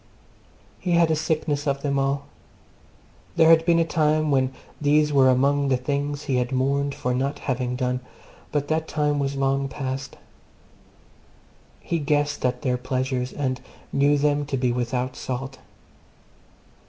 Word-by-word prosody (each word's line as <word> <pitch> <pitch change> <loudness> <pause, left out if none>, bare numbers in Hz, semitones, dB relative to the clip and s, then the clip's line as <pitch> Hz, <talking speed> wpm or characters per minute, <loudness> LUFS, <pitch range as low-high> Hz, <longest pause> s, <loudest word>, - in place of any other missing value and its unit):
He 180 - -1
had 170 -1 +4
a - - +3
sickness 155 -1 -1
of 140 0 -1
them 140 -1 0
all. 135 +1 0 1.1
There 165 -1 +6
had 165 0 +6
been 170 -1 +5
a 165 - +3
time 155 -2 +1
when 130 -1 +2 0.3
these 150 0 +3
were 135 -2 +6
among 140 +2 +2
the 130 -2 +2
things 145 +2 -2
he 125 -2 +1
mourned 140 +2 0
for 125 - -2
not 135 +3 -1
having 125 -1 -2
done, 125 0 -1 0.5
but 145 -1 -1
that 160 0 0
time 150 -1 0
was 140 0 -1
long 135 0 +1
past. 135 -1 -5 1.6
He 170 - -2
guessed 145 0 0
at 125 +2 -1
their 125 -3 +1
pleasures, 130 0 -2
and 130 -3 -2 0.3
knew 145 +1 +3
them 145 0 +1
to 140 -2 -1
be 125 -1 +1
without 125 +1 -2
salt. 130 +1 -5
140 Hz, 150 wpm, -24 LUFS, 130-150 Hz, 1.6 s, There